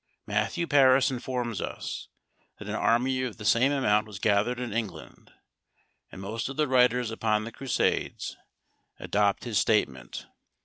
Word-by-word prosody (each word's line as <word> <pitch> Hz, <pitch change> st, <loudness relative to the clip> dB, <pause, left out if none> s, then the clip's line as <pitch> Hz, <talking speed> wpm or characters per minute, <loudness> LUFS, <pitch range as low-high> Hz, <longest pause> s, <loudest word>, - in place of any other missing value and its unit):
Matthew 170 Hz, -1 st, -1 dB
Paris 135 Hz, -3 st, +5 dB
informs 125 Hz, -4 st, -3 dB
us, -, -, -5 dB, 0.5 s
that -, -, -10 dB
an -, -, -3 dB
army 130 Hz, +3 st, +1 dB
of 125 Hz, -4 st, -4 dB
the 105 Hz, -, -8 dB
same 125 Hz, +6 st, +4 dB
amount 110 Hz, -6 st, +2 dB
was 105 Hz, -3 st, -8 dB
gathered 105 Hz, +4 st, +1 dB
in 125 Hz, -4 st, -4 dB
England; 110 Hz, -4 st, -6 dB, 0.8 s
and -, -, -10 dB
most 110 Hz, +6 st, -4 dB
of 135 Hz, -, -7 dB
the 155 Hz, -1 st, +2 dB
writers 125 Hz, -2 st, +3 dB
upon 110 Hz, -1 st, 0 dB
the 115 Hz, -, -7 dB
Crusades 130 Hz, +1 st, -1 dB, 0.6 s
adopt 100 Hz, -1 st, +1 dB
his 115 Hz, -5 st, 0 dB
statement. 65 Hz, -, 0 dB
115 Hz, 145 wpm, -27 LUFS, 105-130 Hz, 0.8 s, Paris